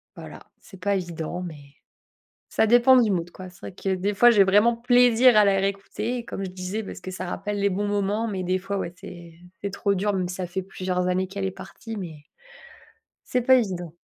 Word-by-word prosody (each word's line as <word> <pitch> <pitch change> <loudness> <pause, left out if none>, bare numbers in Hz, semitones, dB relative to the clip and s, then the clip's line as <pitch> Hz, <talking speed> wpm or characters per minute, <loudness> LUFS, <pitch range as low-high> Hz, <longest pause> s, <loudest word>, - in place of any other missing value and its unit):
voilà, - - -11 0.2
c'est 190 - -15
pas 200 +2 0
évident, 175 -1 -4
mais, 145 -5 -10 0.7
ça - - +2
dépend 240 +3 +6
du 225 -3 +2
mood, 175 -1 -2
quoi. 185 +1 -10
C'est 180 - -18
vrai - - -8
que 190 +1 -2
des 190 +3 -1
fois, 240 +4 +6
j'ai 210 -4 +6
vraiment 210 +5 +4
plaisir 245 0 +5
à 210 - +7
la 200 -1 +3
réécouter, 210 +5 -3
comme 195 -4 -5
je 185 - -5
disais, 185 +4 -4
parce 200 - -9
que 185 - -7
ça 185 0 -5
rappelle 205 +3 -4
les 200 - +2
bons 200 +2 -2
moments. 205 +2 -1
Mais 195 -4 -3
des 185 +1 0
fois, 195 +2 -4
ouais, 170 - -4
c'est 175 -2 -11 0.3
c'est 200 - -2
trop 200 0 0
dur, 205 +2 0
mais 185 -2 -1
ça 185 0 -4
fait 190 +2 -3
plusieurs 185 -1 -3
années 185 +1 0
qu'elle 195 0 -5
est 190 - -1
partie, 195 +4 -9
mais 160 -7 -8 1.0
c'est 250 - 0
pas 260 +2 +6
évident. 180 -7 -4
195 Hz, 215 wpm, -24 LUFS, 180-210 Hz, 1.0 s, à